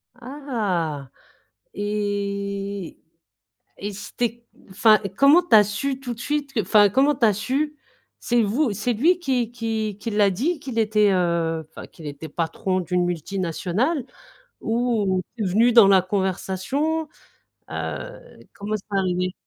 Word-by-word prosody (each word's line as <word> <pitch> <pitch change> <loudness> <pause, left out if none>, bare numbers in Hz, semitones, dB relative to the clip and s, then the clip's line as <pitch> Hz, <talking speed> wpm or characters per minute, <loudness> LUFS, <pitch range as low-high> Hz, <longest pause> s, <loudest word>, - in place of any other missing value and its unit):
Ah 210 - -3 0.7
et 200 -2 -3 0.8
et 205 +1 -4
c'était 235 +3 -4 0.3
enfin, 215 +2 +5 0.2
comment 290 +6 +6
tu 350 - +4
as 210 - +8
su 260 +7 -3
tout 245 -3 -5
de 230 - -13
suite, 290 +1 -2
que 220 - +1
enfin, 205 +2 +5
comment 275 +7 +3
tu 235 - +2
as 215 - +4
su? 280 +8 -2 0.4
C'est 240 -1 +1
vous? 225 +3 +1
C'est 215 +5 -1
lui 335 +11 +3
qui 250 -7 -1
qui 220 -3 -3
qui 230 - -4
l'a 205 -2 +3
dit 295 - -1
qu'il 245 -5 -4
était, 210 -2 +3
heu, 170 -3 0
enfin, - - -10
qu'il 160 -3 -11
était 145 +2 -7
patron 185 +4 -2
d'une 180 0 0
multinationale 185 - -1 0.6
ou 225 -5 0 0.2
c'est 215 - -2
venu 225 +6 +3
dans 225 -4 +8
la 190 -2 +6
conversation? 200 - -1 0.6
Heu, - - -4 0.4
comment 210 +1 -5
c'est 200 -1 -4
arrivé? 185 0 0
210 Hz, 140 wpm, -23 LUFS, 190-245 Hz, 0.8 s, as